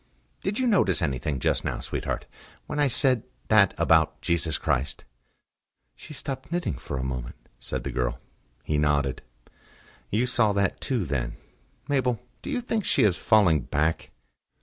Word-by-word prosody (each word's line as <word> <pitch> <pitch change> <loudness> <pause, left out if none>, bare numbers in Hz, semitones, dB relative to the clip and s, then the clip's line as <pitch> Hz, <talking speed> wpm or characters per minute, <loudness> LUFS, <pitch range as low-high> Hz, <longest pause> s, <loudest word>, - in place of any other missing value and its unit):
"Did 205 +2 -2
you 260 - +1
notice 175 - +3
anything 70 -2 -1
just - - +1
now, - - -2
sweetheart - - -3 0.4
when 150 - -4
I 145 - +4
said 130 -1 +3 0.3
that 105 -3 +5
about 80 -1 +3
Jesus 85 -2 0
Christ?" 65 +1 -1 0.9
"She - - -13
stopped 135 -1 -6
knitting 175 - -1
for 65 +2 -5
a 65 - -2
moment," 65 -2 -4 0.2
said 65 -2 -4
the - - -3
girl. - - -1 0.5
He 75 -1 0
nodded. 70 -3 +1 0.9
"You 115 +5 +1
saw 120 -4 +2
that 100 -2 0
too, 120 -8 0
then.... 60 -5 -2 0.5
Mabel, 130 -5 +1 0.2
do - - -7
you 245 - -1
think 225 -3 -1
she - - +2
is 100 -5 +4
falling 95 -9 +4
back?" 75 +5 -1
90 Hz, 155 wpm, -26 LUFS, -, 0.9 s, that